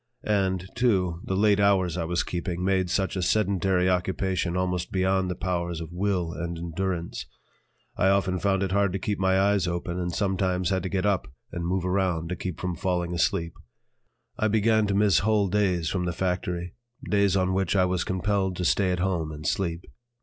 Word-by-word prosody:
And, 95 Hz, -3 st, 0 dB
too, 95 Hz, -8 st, +1 dB
the 95 Hz, -, -1 dB
late 100 Hz, +1 st, +3 dB
hours 95 Hz, -4 st, +3 dB
I 85 Hz, -2 st, -2 dB
was 85 Hz, +1 st, 0 dB
keeping 90 Hz, 0 st, -3 dB
made 95 Hz, -2 st, +1 dB
such 95 Hz, +1 st, 0 dB
a 95 Hz, -, -1 dB
sedentary 95 Hz, -1 st, +2 dB
occupation 90 Hz, -1 st, 0 dB
almost 90 Hz, -1 st, -1 dB
beyond 95 Hz, 0 st, +1 dB
the 90 Hz, -, -2 dB
powers 85 Hz, -2 st, -2 dB
of 80 Hz, -1 st, -7 dB
will 90 Hz, -3 st, -1 dB
and 85 Hz, 0 st, -4 dB
endurance. 85 Hz, -3 st, -3 dB, 0.7 s
I 95 Hz, -, +2 dB
often 95 Hz, -2 st, +1 dB
found 95 Hz, +1 st, +1 dB
it 95 Hz, -, -2 dB
hard 100 Hz, -1 st, +2 dB
to -, -, 0 dB
keep 100 Hz, +1 st, -2 dB
my 95 Hz, 0 st, +3 dB
eyes 100 Hz, -2 st, +2 dB
open 85 Hz, +1 st, -3 dB
and 90 Hz, -1 st, -2 dB
sometimes 95 Hz, -2 st, 0 dB
had 95 Hz, -1 st, +1 dB
to 95 Hz, -, -4 dB
get 95 Hz, +1 st, -1 dB
up 100 Hz, -10 st, 0 dB, 0.2 s
and 85 Hz, -1 st, -3 dB
move 90 Hz, 0 st, -1 dB
around 90 Hz, -3 st, 0 dB
to 90 Hz, -, -2 dB
keep 90 Hz, -2 st, -5 dB
from 90 Hz, -1 st, -2 dB
falling 90 Hz, -2 st, -1 dB
asleep. 85 Hz, -1 st, 0 dB, 0.9 s
I 110 Hz, -, +2 dB
began 110 Hz, 0 st, +3 dB
to 100 Hz, -, 0 dB
miss 100 Hz, -4 st, +4 dB
whole 105 Hz, -1 st, +2 dB
days 90 Hz, -5 st, +1 dB
from 90 Hz, -2 st, -1 dB
the 85 Hz, -, -1 dB
factory, 90 Hz, -1 st, -2 dB, 0.3 s
days 100 Hz, -2 st, +3 dB
on 95 Hz, 0 st, +1 dB
which 95 Hz, 0 st, 0 dB
I 95 Hz, -1 st, +4 dB
was 90 Hz, -1 st, 0 dB
compelled 95 Hz, 0 st, 0 dB
to 90 Hz, -, -3 dB
stay 95 Hz, +3 st, +2 dB
at 90 Hz, -1 st, -1 dB
home 85 Hz, -5 st, -1 dB
and 75 Hz, 0 st, -8 dB
sleep. 85 Hz, +2 st, -1 dB
95 Hz, 195 wpm, -26 LUFS, 85-95 Hz, 0.9 s, miss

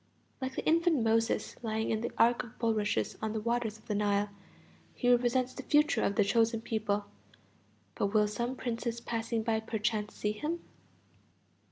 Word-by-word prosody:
Like 260 Hz, 0 st, -3 dB
the -, -, -3 dB
infant 330 Hz, -5 st, +3 dB
Moses 225 Hz, +1 st, +1 dB
lying 220 Hz, -1 st, -1 dB
in 220 Hz, -1 st, 0 dB
the 235 Hz, -, -2 dB
ark 235 Hz, +1 st, +4 dB
of 240 Hz, -3 st, -13 dB
bulrushes 215 Hz, -3 st, 0 dB
on 220 Hz, -1 st, -2 dB
the 220 Hz, -, -1 dB
waters 230 Hz, -1 st, -1 dB
of 215 Hz, -, -23 dB
the 210 Hz, -, -2 dB
Nile 205 Hz, 0 st, +1 dB, 0.6 s
he 245 Hz, -, +2 dB
represents 245 Hz, +1 st, +2 dB
the -, -, -6 dB
future 300 Hz, 0 st, +3 dB
of 200 Hz, -, +1 dB
the 210 Hz, -, +4 dB
chosen 225 Hz, +2 st, +2 dB
people; 215 Hz, -3 st, -1 dB, 0.9 s
but 200 Hz, -, 0 dB
will 210 Hz, +1 st, +3 dB
some 235 Hz, +5 st, -2 dB
princess 235 Hz, -1 st, -3 dB
passing 230 Hz, -1 st, -2 dB
by 220 Hz, -1 st, +1 dB
perchance 215 Hz, -1 st, -2 dB
see 210 Hz, -, -1 dB
him? 305 Hz, +11 st, -3 dB
225 Hz, 170 wpm, -31 LUFS, 215-240 Hz, 0.9 s, ark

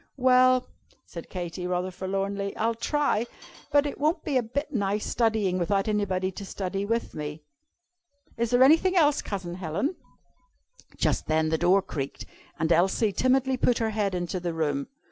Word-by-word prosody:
"Well," 255 Hz, 0 st, +4 dB, 0.4 s
said -, -, -9 dB
Katy, 180 Hz, 0 st, -5 dB
rather 180 Hz, +1 st, -1 dB
forlornly, 195 Hz, +2 st, -3 dB
"I'll 230 Hz, +1 st, +1 dB
try. 240 Hz, -1 st, 0 dB, 0.4 s
But 290 Hz, 0 st, +4 dB
it 285 Hz, -, -4 dB
won't 310 Hz, +2 st, +1 dB
be 295 Hz, -, -2 dB
a 255 Hz, -, +4 dB
bit 285 Hz, +6 st, -4 dB
nice 205 Hz, -2 st, 0 dB
studying 220 Hz, -6 st, +1 dB
without 195 Hz, +3 st, 0 dB
anybody 190 Hz, -3 st, 0 dB
to 195 Hz, -, -8 dB
study 195 Hz, 0 st, -3 dB
with 230 Hz, +2 st, -2 dB
me. 150 Hz, 0 st, -6 dB, 0.9 s
Is 235 Hz, 0 st, -1 dB
there 245 Hz, +2 st, +5 dB
anything 330 Hz, +7 st, +5 dB
else, 300 Hz, -4 st, +4 dB
Cousin 185 Hz, -4 st, -5 dB
Helen?" 185 Hz, -, -2 dB, 1.0 s
Just -, -, 0 dB
then 155 Hz, 0 st, +2 dB
the 160 Hz, -, +1 dB
door 185 Hz, +3 st, +4 dB
creaked, 140 Hz, -6 st, -5 dB, 0.3 s
and 160 Hz, +1 st, 0 dB
Elsie 190 Hz, +6 st, +3 dB
timidly 260 Hz, +2 st, +2 dB
put 245 Hz, -1 st, +2 dB
her 225 Hz, -1 st, 0 dB
head 205 Hz, -3 st, -1 dB
into 175 Hz, +1 st, -2 dB
the 170 Hz, -2 st, -3 dB
room. 145 Hz, -3 st, -1 dB
200 Hz, 165 wpm, -27 LUFS, 180-255 Hz, 1.0 s, there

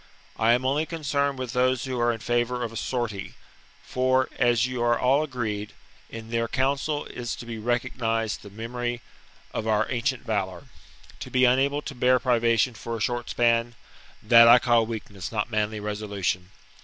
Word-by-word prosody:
I 115 Hz, +1 st, +5 dB
am 125 Hz, +2 st, 0 dB
only 145 Hz, +4 st, +1 dB
concerned 140 Hz, -4 st, -1 dB
with 130 Hz, -2 st, -5 dB
those 130 Hz, -1 st, +2 dB
who 130 Hz, -2 st, -3 dB
are 120 Hz, 0 st, +3 dB
in 115 Hz, -1 st, -5 dB
favour 120 Hz, +1 st, 0 dB
of 115 Hz, -, -4 dB
a -, -, -11 dB
sortie; 110 Hz, -6 st, -3 dB, 0.5 s
for, 130 Hz, 0 st, +1 dB
as 120 Hz, 0 st, +3 dB
you 130 Hz, -1 st, -3 dB
are 120 Hz, 0 st, +3 dB
all 135 Hz, +3 st, +3 dB
agreed, 110 Hz, -8 st, -4 dB, 0.4 s
in 115 Hz, 0 st, -9 dB
th 115 Hz, 0 st, +1 dB
eir 115 Hz, -, -1 dB
co 130 Hz, +1 st, +2 dB
unsel 145 Hz, +1 st, -3 dB
is 120 Hz, -1 st, -5 dB
to -, -, -9 dB
be 115 Hz, -1 st, -6 dB
recognized 115 Hz, -1 st, -1 dB
the 100 Hz, -, -11 dB
memory 120 Hz, +3 st, -4 dB, 0.5 s
of 110 Hz, -, -3 dB
our 110 Hz, 0 st, +2 dB
ancient 130 Hz, +1 st, -1 dB
valour. 95 Hz, -5 st, -2 dB, 0.6 s
To -, -, -7 dB
be 130 Hz, 0 st, +3 dB
unable 140 Hz, +4 st, +2 dB
to -, -, -6 dB
bear 125 Hz, 0 st, +3 dB
privation 120 Hz, -1 st, +2 dB
for 115 Hz, +1 st, -5 dB
a -, -, -8 dB
short 120 Hz, +2 st, -2 dB
span, 120 Hz, 0 st, +1 dB, 0.2 s
— -, -, -25 dB
that 115 Hz, +2 st, +8 dB
I 120 Hz, +1 st, +9 dB
call 120 Hz, -2 st, +3 dB
weak 110 Hz, -2 st, -5 dB
ness, 95 Hz, -3 st, -7 dB
not 110 Hz, +1 st, -2 dB
manly 110 Hz, 0 st, -1 dB
resolution. 100 Hz, -4 st, -3 dB
120 Hz, 190 wpm, -25 LUFS, 110-130 Hz, 0.6 s, I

